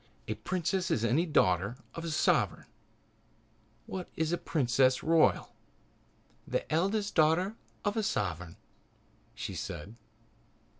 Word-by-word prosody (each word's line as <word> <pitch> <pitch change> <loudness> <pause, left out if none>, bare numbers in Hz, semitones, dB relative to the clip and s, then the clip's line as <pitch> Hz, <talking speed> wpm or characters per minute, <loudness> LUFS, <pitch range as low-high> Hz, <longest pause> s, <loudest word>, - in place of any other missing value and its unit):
"A - - -1
princess 185 0 -1
is 115 - +1
any 145 +10 +2
daughter 100 - +2 0.2
of 165 - -6
a 170 - -3
sovereign. 155 - +2 1.2
What 185 -2 -6
is 160 0 0
a - - +2
princess 130 -4 +2
royal?" 165 0 +3 0.9
"The - - -1
eldest 200 +5 +1
daughter 165 +6 +3 0.3
of 205 - +1
a 220 - +1
sovereign," 90 - -2 0.8
she - - -5
said. 90 +9 -6
160 Hz, 115 wpm, -31 LUFS, 120-180 Hz, 1.2 s, royal